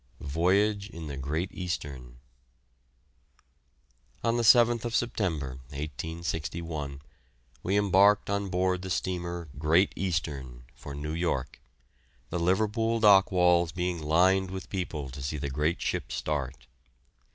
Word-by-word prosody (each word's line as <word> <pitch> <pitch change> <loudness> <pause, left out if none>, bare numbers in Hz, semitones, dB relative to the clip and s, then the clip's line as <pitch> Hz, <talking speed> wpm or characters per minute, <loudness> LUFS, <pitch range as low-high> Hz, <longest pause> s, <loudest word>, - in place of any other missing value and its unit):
VOYAGE 100 +8 +1
IN 85 -5 -8
THE 70 -2 -5
"GREAT 75 +7 -2
EASTERN." 70 -9 -5 2.1
On 115 0 +2
the 120 - +1
7th 120 0 +5
September, 80 - -1
1861, 75 0 -5 0.6
we 95 +3 +1
embarked 100 0 +4
on 100 0 -1
board 90 0 0
the 95 - -6
steamer 85 -2 -3
"Great 80 +6 +3
Eastern," 70 -9 -3
for 75 -2 -9
New 75 +2 -4
York, 85 -6 -2 0.7
the 90 - -1
Liverpool 110 +6 +1
dock 100 -3 +6
walls 90 -2 +4
being 90 0 -2
lined 90 +5 +3
with 95 -1 -7
people 80 -8 -4
to 70 +2 -8
see 70 +3 -3
the 70 -1 -3
great 75 +5 0
ship - - -2
start. 75 -4 -3
85 Hz, 120 wpm, -28 LUFS, 75-95 Hz, 2.1 s, dock